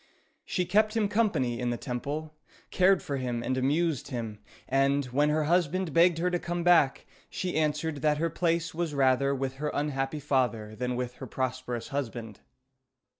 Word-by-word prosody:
She 180 - -1
kept 215 +4 +2
him 215 -2 +2
company 200 - +1
in 125 -1 -1
the 120 - -1
temple, 145 +5 -4 0.4
cared 190 0 +4
for 140 - -3
him 120 -2 -2
and 130 - -1
amused 145 +2 0
him, 115 -4 -5 0.3
and, 140 +1 +2
when 140 +4 +1
her 155 +1 +1
husband 175 +2 +1
begged 170 0 +5
her 180 +2 0
to 175 - 0
come 175 0 -3
back, 165 -6 +4 0.2
she 180 -1 -3
answered 155 0 0
that 150 +1 +1
her 165 +1 0
place 165 0 0
was 165 -2 -2
rather 140 0 +3
with 135 0 -3
her 150 +1 -2
unhappy 145 0 -1
father 125 -7 0
than 125 +2 -2
with 125 0 -4
her 130 - -7
prosperous 130 -1 -3
husband. 120 -6 -4
145 Hz, 175 wpm, -28 LUFS, 130-170 Hz, 0.4 s, begged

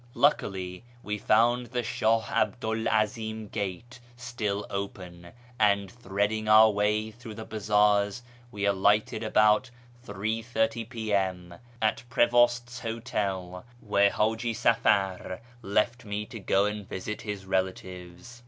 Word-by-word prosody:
Luckily 95 -9 0 0.2
we 105 0 -3
found 120 +4 +3
the 125 +1 -2
Shah 110 0 +1
'Abdu 110 +1 0
'l 110 0 -1
'Azim 110 0 -1
gate 110 +5 -5 0.2
still 110 -5 -3
open, 90 -3 -6 0.3
and, 100 -2 +2
threading 105 0 -2
our 110 +1 +7
way 105 +1 0
through 115 -1 -10
the 110 0 -7
bazaars, 105 0 +2 0.3
we 100 -3 -3
alighted 100 +2 +2
about 110 +2 +3 0.3
8.30 110 +1 -2
P.M. 95 -6 -2 0.3
at 110 - +1
Prevost's 120 0 +2
hotel, 100 -6 -3 0.2
where 100 -2 +3
Haji 110 +3 0
Safar 95 -5 +1 0.2
left 110 +3 0
me 105 -1 -4
to 115 - -9
go 95 0 +2
md 105 -1 -3
visit 105 +3 -5
his 105 -2 -6
relatives. 95 +3 -4
105 Hz, 120 wpm, -28 LUFS, 100-115 Hz, 0.3 s, our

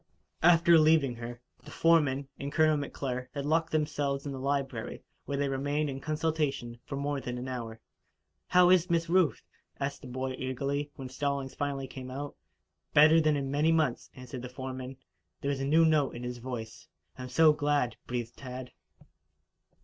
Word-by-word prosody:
After 170 0 +6
leaving 155 -6 +4
her, 120 +1 -7 0.2
the - - -12
foreman 145 -5 +3
and 140 +1 -4
Colonel 155 0 +4
McClure 130 -3 -4
had 140 -1 -3
locked 160 +2 +1
themselves 145 -3 -1
in 140 - -3
the 135 - -5
library, 135 -4 -2 0.2
where 140 - -2
they 140 0 +1
remained 145 +2 -1
in 135 - -5
consultation 155 -6 -1
for 140 - -4
more 140 0 -2
than 125 -1 -4
an 125 +1 -5
hour. 115 -3 -5 0.7
"How 180 0 +6
is 180 -1 +4
Miss 170 0 +1
Ruth?" 180 -3 +2 0.4
asked 140 0 -3
the - - -9
boy 130 +1 -3
eagerly, 140 +3 -2
when 135 -3 -7
Stallings 140 0 -2
finally 140 -1 -2
came 130 -1 -8
out. 140 +2 -6 0.6
"Better 155 +2 +7
than 155 -1 +3
in 135 -1 -3
many 150 +3 +3
months," 155 -7 +1
answered 125 0 -8
the 125 - -7
foreman. 130 0 -6 0.4
There 140 - -1
was 140 -1 -1
a - - -1
new 160 +3 +5
note 155 -5 +2
in 120 - -6
his 125 0 -5
voice. 120 +2 -7 0.3
"I'm 125 0 -6
so 155 +4 +6
glad," 145 -5 0
breathed 120 -1 -4
Tad. 130 -1 -7
140 Hz, 175 wpm, -30 LUFS, 130-155 Hz, 0.7 s, Better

